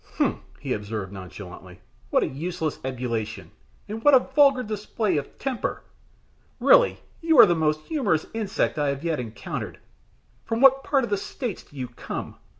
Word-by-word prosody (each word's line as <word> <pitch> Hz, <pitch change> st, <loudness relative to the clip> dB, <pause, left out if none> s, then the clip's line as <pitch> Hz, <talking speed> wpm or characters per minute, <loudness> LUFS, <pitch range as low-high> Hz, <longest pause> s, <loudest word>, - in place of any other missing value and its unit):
"Humph!" -, -, +1 dB, 0.2 s
he -, -, -2 dB
observed, 105 Hz, -2 st, -4 dB
nonchalantly. 95 Hz, -1 st, -10 dB, 0.3 s
"What -, -, +3 dB
a -, -, 0 dB
useless 160 Hz, +2 st, -3 dB
ebullition, 120 Hz, -4 st, -4 dB, 0.4 s
and 220 Hz, +2 st, -6 dB
what 290 Hz, -1 st, +7 dB
a -, -, +8 dB
vulgar 275 Hz, -3 st, +5 dB
display 210 Hz, -3 st, -1 dB
of 145 Hz, -, -5 dB
temper! 260 Hz, -4 st, -3 dB, 0.8 s
Really -, -, +5 dB, 0.2 s
you 325 Hz, -2 st, +3 dB
are 240 Hz, -, +11 dB
the 175 Hz, -, +3 dB
most 155 Hz, -2 st, +1 dB
humorous 210 Hz, -, 0 dB
insect 215 Hz, -7 st, -1 dB
I 145 Hz, -, +1 dB
have 140 Hz, +2 st, -3 dB
yet 165 Hz, -4 st, -1 dB
encountered. 115 Hz, -2 st, -5 dB, 0.7 s
From 225 Hz, -, -2 dB
what 270 Hz, +1 st, +6 dB
part 275 Hz, -3 st, +2 dB
of 235 Hz, -, -4 dB
the 205 Hz, -, +2 dB
States 215 Hz, +1 st, -5 dB
do -, -, -21 dB
you 130 Hz, -2 st, -4 dB
come? 120 Hz, -, -7 dB
170 Hz, 165 wpm, -25 LUFS, -, 0.8 s, are